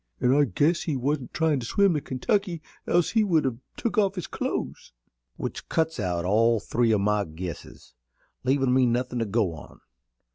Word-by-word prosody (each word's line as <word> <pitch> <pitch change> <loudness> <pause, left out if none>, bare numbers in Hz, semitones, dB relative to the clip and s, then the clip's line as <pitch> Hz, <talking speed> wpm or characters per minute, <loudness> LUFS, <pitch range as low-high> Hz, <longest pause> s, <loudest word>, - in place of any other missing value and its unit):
An' 125 0 +3
I 145 +1 +4
guess 145 - +1
he 155 - -2
wasn't 135 0 -2
tryin' 160 -4 +1
to 120 - -6
swim 200 +3 +3
the 150 - -1
Kentucky, 170 - -1 0.2
else 175 -1 +2
he 220 -2 +3
would 165 -8 +2
have 125 -3 -2 0.2
took 230 -2 0
off 200 -1 +2
his 180 - -4
clothes." - - -4 0.4
"Which - - -6
cuts 160 -3 0
out 90 -3 -1
all 115 +4 +3
three 115 +3 +1
o' 110 - +4
my 105 +1 +1
guesses, 85 -5 -8 0.5
leavin' 130 -1 +2
me 130 -1 +4
nothin' 125 +1 -1
to 115 - 0
go 105 -4 0
on. 75 - -12
130 Hz, 185 wpm, -26 LUFS, 110-160 Hz, 0.5 s, I